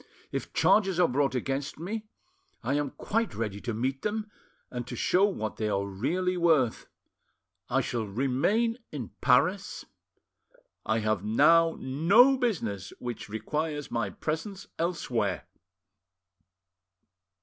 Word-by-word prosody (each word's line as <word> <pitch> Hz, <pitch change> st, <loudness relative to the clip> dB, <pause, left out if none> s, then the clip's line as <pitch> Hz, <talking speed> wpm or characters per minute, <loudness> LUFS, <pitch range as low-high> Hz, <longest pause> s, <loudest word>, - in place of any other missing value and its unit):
If -, -, -4 dB
charges 195 Hz, -4 st, +3 dB
are 175 Hz, -, +6 dB
brought 135 Hz, +1 st, +1 dB
against 135 Hz, +3 st, -2 dB
me, 210 Hz, +7 st, -5 dB, 0.6 s
I 125 Hz, +4 st, 0 dB
am 145 Hz, -1 st, 0 dB
quite 225 Hz, +10 st, -2 dB
ready 105 Hz, -3 st, -3 dB
to 120 Hz, -, -3 dB
meet 130 Hz, +4 st, -2 dB
them, 210 Hz, 0 st, -3 dB, 0.4 s
and 125 Hz, -1 st, -5 dB
to 125 Hz, -, -5 dB
show 180 Hz, -, +3 dB
what 110 Hz, -, -3 dB
they 110 Hz, -1 st, -1 dB
are 100 Hz, -1 st, 0 dB
really 175 Hz, -, -1 dB
worth. 155 Hz, -9 st, +2 dB, 0.8 s
I -, -, +2 dB
shall 115 Hz, -3 st, -2 dB
remain 140 Hz, -, +1 dB
in -, -, -6 dB
Paris, -, -, +2 dB, 1.0 s
I 110 Hz, 0 st, +1 dB
have 110 Hz, -3 st, 0 dB
now 165 Hz, +10 st, +4 dB
no 195 Hz, -, +5 dB
business 130 Hz, -, -2 dB
which 120 Hz, -3 st, -6 dB
requires 145 Hz, +8 st, -3 dB
my 115 Hz, -4 st, -1 dB
presence 160 Hz, -, -4 dB
elsewhere." 120 Hz, -, -1 dB
140 Hz, 125 wpm, -28 LUFS, 115-180 Hz, 1.0 s, are